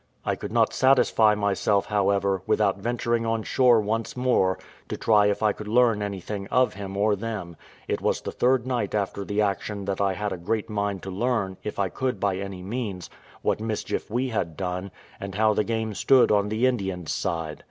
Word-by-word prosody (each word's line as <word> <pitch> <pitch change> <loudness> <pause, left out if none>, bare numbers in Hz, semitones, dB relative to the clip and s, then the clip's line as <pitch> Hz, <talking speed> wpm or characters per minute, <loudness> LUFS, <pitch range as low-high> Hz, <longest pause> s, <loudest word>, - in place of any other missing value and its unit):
I - - +1
could - - -7
not - - +2
satisfy 125 -5 +4
myself, 100 -1 +1
however, 100 -2 +1
without 100 -2 +2
venturing 120 +1 -1
on 115 -1 -1
shore 125 -1 +4
once 110 +3 -2
more, 125 -7 +2 0.3
to - - -4
try 105 -2 +4
if 105 +1 0
I 105 -1 +3
could 105 - -9
learn 115 -1 +3
anything 100 0 -4
of 125 +3 +2
him 100 0 -6
or 105 +1 +3
them; 100 -5 -5 0.3
it - - -1
was - - +1
the - - -5
third 125 -1 +2
night 120 -6 -1
after 100 -1 -2
the 105 +2 -1
action 100 0 -2
that 100 0 -2
I 100 -1 +2
had 105 +1 -3
a - - -5
great 110 +5 -2
mind 100 -2 -2
to 95 - -5
learn, 100 -2 -1
if 105 - -5
I 100 -2 0
could 130 -3 -2
by 100 -1 0
any 95 -2 -6
means, 100 -4 -4 0.3
what - - +1
mischief 110 -1 -3
we 125 +4 -1
had 90 -9 -2
done, 90 +1 -3 0.3
and 100 0 -6
how 110 +1 +3
the 105 - +1
game 110 -1 -2
stood 130 +4 +4
on 105 -1 +2
the 110 +4 +1
Indians' 95 -9 -1
side. 80 -2 -3
105 Hz, 200 wpm, -25 LUFS, 95-115 Hz, 0.3 s, satisfy